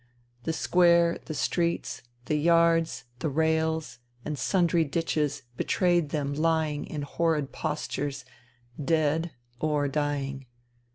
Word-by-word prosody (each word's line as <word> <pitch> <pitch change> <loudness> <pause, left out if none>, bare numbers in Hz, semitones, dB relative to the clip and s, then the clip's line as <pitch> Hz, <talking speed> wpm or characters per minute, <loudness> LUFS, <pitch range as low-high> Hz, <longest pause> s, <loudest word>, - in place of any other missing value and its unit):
The 165 - +1
square, 170 0 +4
the 155 - -5
streets, 170 +2 -1 0.2
the 155 - -1
yards, 165 -3 +3 0.2
the 155 - -1
rails, 160 -1 0 0.3
and 150 - -2
sundry 170 +2 +2
ditches 150 -2 -1
betrayed 175 -4 +2
them 145 -2 -2
lying 155 -1 0
in 150 -2 -4
horrid 150 -1 0
postures, 145 -3 -3 0.6
dead 160 +2 +1 0.3
or 150 -1 +1
dying. 140 -2 -2
155 Hz, 110 wpm, -27 LUFS, 145-165 Hz, 0.6 s, square